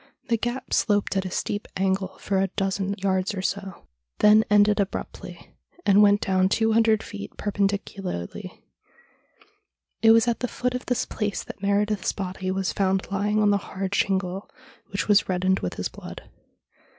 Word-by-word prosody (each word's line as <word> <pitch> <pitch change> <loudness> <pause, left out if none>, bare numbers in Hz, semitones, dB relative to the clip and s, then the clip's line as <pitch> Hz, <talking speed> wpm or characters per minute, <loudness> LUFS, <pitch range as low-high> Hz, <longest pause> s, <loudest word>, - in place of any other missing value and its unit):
The 230 - +3
gap 240 +3 -4
sloped 205 -3 +1
at 190 0 0
a - - -3
steep 205 +3 -3
angle 190 0 -1
for 195 -1 -1
a 195 - +2
dozen 195 +1 -2
yards 190 +1 0
or 185 - -4
so, 195 -2 -4 0.3
then 215 +1 +6
ended 205 0 +4
abruptly, 200 -1 -5 0.3
and 200 +1 +6
went 205 0 +5
down 190 0 +2
two 225 +2 +2
hundred 220 -1 +3
feet 100 0 -8
perpendicularly. 195 - -3 1.4
It 225 - +5
was 225 +1 +6
at 235 -2 0
the 250 - -1
foot 250 +1 -2
of 250 - -5
this 250 - 0
place 210 -2 -3
that - - -10
Meredith's 205 0 +1
body 185 -1 -4
was 190 0 -1
found 195 0 0
lying 210 +2 +1
on 205 - +4
the 200 - +3
hard 195 0 -5
shingle, 190 -1 -1 0.4
which 195 - -2
was 205 -2 +4
reddened 185 +1 +1
with 90 - -4
his - - -2
blood. - - -10
200 Hz, 165 wpm, -25 LUFS, 190-210 Hz, 1.4 s, then